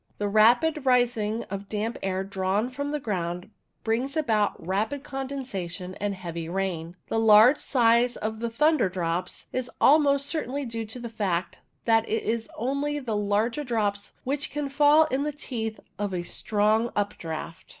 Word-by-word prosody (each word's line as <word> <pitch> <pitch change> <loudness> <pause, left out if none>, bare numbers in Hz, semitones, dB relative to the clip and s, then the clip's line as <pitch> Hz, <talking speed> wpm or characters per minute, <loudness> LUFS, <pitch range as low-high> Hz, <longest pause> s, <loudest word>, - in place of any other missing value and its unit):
The 205 - -1
rapid 240 +9 +4
rising 235 -4 +2
of 195 +1 -7
damp 220 +2 -2
air 190 0 -1
drawn 195 +4 -1
from 285 +3 -3
the 300 0 -2
ground 180 -4 -3 0.3
brings 250 +7 -1
about 220 -9 +1
rapid 215 +10 -2
condensation 250 -11 -5
and 205 -1 -1
heavy 170 -3 -6
rain. 175 -2 -3
The 225 - +1
large 225 +5 +7
size 240 -1 +3
of 220 +1 -4 0.2
thunder 300 -7 +3
drops 180 0 -3
is 255 -1 -2
almost 280 -1 +5
certainly 285 -2 -2
due 230 -2 -4
to 220 +4 -8
the 240 - -5
fact 195 -6 -2 0.3
that 225 -1 +3
it 225 - 0
is 225 0 -2
only 280 +5 -1
the 250 -7 -3
larger 210 +7 0
drops 210 -5 -2
which 280 +2 -1
can 295 -1 -3
fall 295 +2 +5
in 265 - +1
the 300 +1 -1
teeth 230 -6 -4 0.2
of 205 -1 -1
the 180 -2 -3
strong 215 +5 +1
updraught. 165 -5 -4
225 Hz, 160 wpm, -26 LUFS, 200-270 Hz, 0.3 s, large